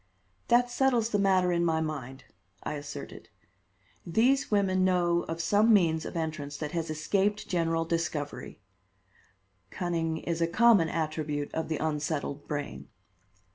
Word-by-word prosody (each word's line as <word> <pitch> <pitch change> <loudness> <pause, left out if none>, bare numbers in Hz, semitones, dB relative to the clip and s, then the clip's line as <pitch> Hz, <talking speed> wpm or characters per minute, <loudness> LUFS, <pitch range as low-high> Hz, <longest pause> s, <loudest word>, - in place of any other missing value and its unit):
"That 245 +1 +3
settles 245 -3 +2
the 205 - +1
matter 190 -2 +3
in 170 0 +1
my 160 -2 +1
mind," 140 -4 -5 0.4
I - - -3
asserted. 145 -1 -8 0.7
"These 235 +10 +2
women 190 -3 +2
know 175 -2 +2
of 165 0 -4
some 205 +7 +3
means 165 -6 +3
of - - -5
entrance 155 -3 -4
that 150 -1 -4
has 165 -2 -3
escaped 195 +7 0
general 165 -2 0
discovery. 165 -3 -3 1.1
Cunning 165 - -2
is 170 0 -3
a 165 - +3
common 205 -2 +4
attribute 155 -2 -3
of 160 - -2
the 155 - -1
unsettled 150 -2 -3
brain." 105 - -5
165 Hz, 135 wpm, -29 LUFS, 155-190 Hz, 1.1 s, common